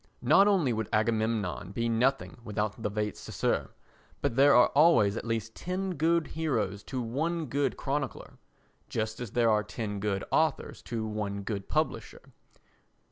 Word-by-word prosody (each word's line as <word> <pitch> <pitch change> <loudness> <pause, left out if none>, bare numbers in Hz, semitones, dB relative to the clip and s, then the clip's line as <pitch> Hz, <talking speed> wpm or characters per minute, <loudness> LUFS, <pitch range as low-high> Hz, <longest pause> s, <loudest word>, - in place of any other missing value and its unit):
Not 200 - +6
only 175 - +3
would 110 -2 -3
Agamemnon 110 -4 0
be 115 +2 -1
nothing 125 +5 0
without 105 0 -3
the 105 - -1
vates 105 0 -3
sacer - - -1 0.5
but 140 -5 -1
there 140 +2 +6
are 125 - +6
always 140 -10 +4
at - - -5
least 115 -1 -2
ten 185 +1 -3
good 165 +1 +2
heroes 110 -11 -2
to 130 - -4
one 160 +8 -2
good 140 +1 -1
chronicler, 140 -1 -4 0.5
just 110 0 -3
as 120 -5 -6
there 120 -2 +3
are 105 0 +3
ten 105 -1 -5
good 100 -1 -1
authors 155 -3 0
to 115 -2 -4
one 105 -2 -3
good 100 -1 -4
publisher. - - -3
115 Hz, 155 wpm, -29 LUFS, 105-140 Hz, 0.5 s, Not